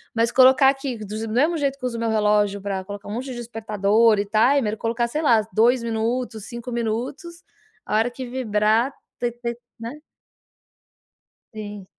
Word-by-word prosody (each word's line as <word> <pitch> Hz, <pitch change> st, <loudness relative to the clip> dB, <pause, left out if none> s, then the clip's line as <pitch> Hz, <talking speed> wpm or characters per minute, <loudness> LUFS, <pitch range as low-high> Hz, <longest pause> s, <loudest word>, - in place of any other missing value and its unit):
Mas 230 Hz, 0 st, +2 dB
colocar 260 Hz, +1 st, +6 dB
aqui 270 Hz, -2 st, -2 dB
do 210 Hz, -1 st, -7 dB
mesmo 295 Hz, +10 st, +2 dB
jeito 280 Hz, -2 st, -1 dB
que 255 Hz, -, -5 dB
uso 240 Hz, -2 st, -2 dB
meu 230 Hz, 0 st, -1 dB
relógio 210 Hz, -2 st, +2 dB
pra 195 Hz, -1 st, -3 dB
colocar 205 Hz, 0 st, -8 dB
um -, -, -4 dB
monte 245 Hz, +4 st, -4 dB
de -, -, -6 dB
despertador 220 Hz, -1 st, +2 dB
e 205 Hz, -, 0 dB
timer, 220 Hz, +2 st, +2 dB
colocar, 235 Hz, +2 st, -1 dB
sei 300 Hz, +6 st, -2 dB
lá, 235 Hz, -8 st, +4 dB
2 240 Hz, +3 st, +4 dB
minutos, 230 Hz, -1 st, -2 dB
5 235 Hz, +1 st, -7 dB
minutos, 240 Hz, +9 st, -4 dB, 0.4 s
a -, -, -2 dB
hora 225 Hz, +3 st, +1 dB
que 260 Hz, +1 st, -7 dB
vibrar, 230 Hz, 0 st, +1 dB, 0.3 s
te 240 Hz, -1 st, 0 dB
te 235 Hz, 0 st, -5 dB, 0.2 s
né? 240 Hz, +7 st, -7 dB, 1.5 s
Sim. 205 Hz, -3 st, -8 dB
230 Hz, 165 wpm, -23 LUFS, 215-255 Hz, 1.5 s, colocar